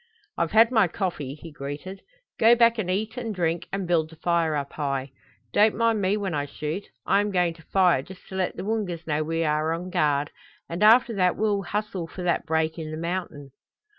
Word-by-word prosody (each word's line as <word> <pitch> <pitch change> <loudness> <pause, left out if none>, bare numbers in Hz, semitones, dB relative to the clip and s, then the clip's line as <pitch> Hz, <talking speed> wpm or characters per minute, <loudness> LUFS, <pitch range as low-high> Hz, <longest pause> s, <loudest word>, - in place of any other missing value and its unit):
"I've 165 - 0
had 225 +2 +6
my 220 -6 +4
coffee," 160 -7 -3
he 165 +1 -11
greeted. 145 +7 -7 0.4
"Go 230 +2 +7
back 235 -1 +4
and 185 -4 -2
eat 215 +5 -2
and 225 -4 -4
drink, 170 -2 -1
and 195 -2 -3
build 165 -3 +1
the 160 - -14
fire 165 -1 +1
up 140 -1 -3
high. 140 -2 -2 0.4
Don't 210 +1 +4
mind 230 -1 +2
me 195 +2 +1
when 195 -4 -3
I 145 -1 -1
shoot. 155 +7 -4 0.2
I 200 - +3
am 205 - -1
going 180 -3 +1
to 165 - -17
fire 180 -3 +3
just 185 +6 -13
to 190 - -7
let 185 -1 -1
the - - -5
Woongas 195 -6 -2
know 150 -1 0
we 165 +1 -1
are 155 0 +1
on 180 +2 -5
guard, 150 -4 +1 0.4
and 170 +3 -5
after 230 +2 +6
that 180 -1 +3
we'll 205 -2 +1
hustle 195 -2 -3
for 180 +2 -8
that 175 0 0
break 160 0 0
in 155 -1 -5
the 155 - -5
mountain." 170 -5 -4
175 Hz, 215 wpm, -25 LUFS, 155-205 Hz, 0.4 s, Go